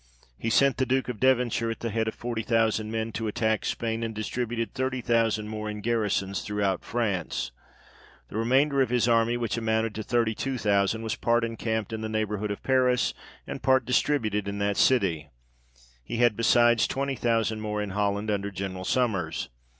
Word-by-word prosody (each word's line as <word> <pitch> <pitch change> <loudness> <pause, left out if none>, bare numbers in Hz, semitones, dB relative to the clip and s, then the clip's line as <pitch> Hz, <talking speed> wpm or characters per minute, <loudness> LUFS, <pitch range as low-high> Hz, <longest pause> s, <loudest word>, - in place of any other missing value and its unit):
He 115 - -3
sent 135 +3 +4
the 130 - +1
Duke 130 0 0
of 115 -4 -5
Devonshire 125 -3 +2
at 115 - -5
the 115 - -2
head 110 +1 0
of 110 - -3
forty 120 -2 -3
thousand 110 -1 +1
men 115 0 -2
to 115 0 -3
attack 110 +1 0
Spain, 115 -1 -2
and 115 -1 -3
distributed 115 +1 -3
thirty 130 0 -1
thousand 115 -3 +1
more 110 0 -4
in 105 0 -5
garrisons 105 -4 0
throughout 100 -3 -1
France; 105 -8 -2 0.8
the - - -10
remainder 135 +5 +3
of 130 - +2
his 125 -1 +2
army, 115 0 +3
which 115 -2 -2
amounted 110 -1 0
to 110 - -4
thirty 115 0 +1
two 135 +4 -3
thousand, 105 0 +1
was 110 0 -1
part 120 0 +1
encamped 110 -2 -2
in 110 - -3
the 110 - -3
neighbourhood 105 -1 -2
of 100 - -5
Paris, 125 -2 +2 0.3
and - - -6
part 130 0 +3
distributed 110 -6 +1
in 100 0 -3
that 100 0 0
city; 90 - +2 0.7
he 90 - -4
had 120 -2 +4
besides, 120 0 +4
twenty 135 0 -2
thousand 115 -3 0
more 105 -1 -2
in 105 -1 -3
Holland, 100 +1 0
under 100 -1 -1
General 95 -1 -5
Sommers. 95 -11 0
110 Hz, 185 wpm, -27 LUFS, 105-120 Hz, 0.8 s, sent